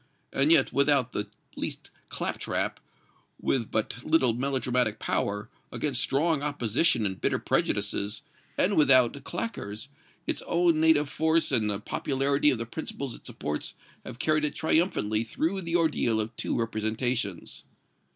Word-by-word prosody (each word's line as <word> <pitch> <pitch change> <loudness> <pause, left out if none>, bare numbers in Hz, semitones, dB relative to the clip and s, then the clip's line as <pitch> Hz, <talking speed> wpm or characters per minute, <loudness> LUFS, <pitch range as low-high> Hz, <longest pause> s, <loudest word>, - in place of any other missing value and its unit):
"And 140 +3 +4
yet, 165 - +5
without 140 -3 +3
the 105 - -2 0.3
least - - -3 0.2
claptrap, - - -2 0.6
with 120 -5 -1
but 110 +3 -2
little 145 -7 +4
melodramatic 125 -3 0
power, 105 0 -1 0.2
against 140 -5 -1
strong 150 +2 +1
opposition 135 -2 +1
and 95 -2 -3
bitter - - +1
prejudices, 105 +4 -1 0.3
and 200 +2 +2
without 135 -2 +4
claqueurs, 140 - -5 0.4
its - - -1
own 170 -2 +2
native 160 -2 +4
force 160 +2 +1
and 110 -5 +2
the 100 -1 -1
popularity 140 +5 +1
of 130 - +1
the 115 - -4
principles 135 0 -6
it - - -12
supports 75 0 -5 0.3
have - - -9
carried 155 +3 +1
it 150 - -1
triumphantly 155 - +1
through 165 - -2
the 170 -1 -3
ordeal 150 -9 +2
of 110 +2 -3
two - - -2
representations. 110 -3 -2
135 Hz, 140 wpm, -27 LUFS, 110-155 Hz, 0.6 s, yet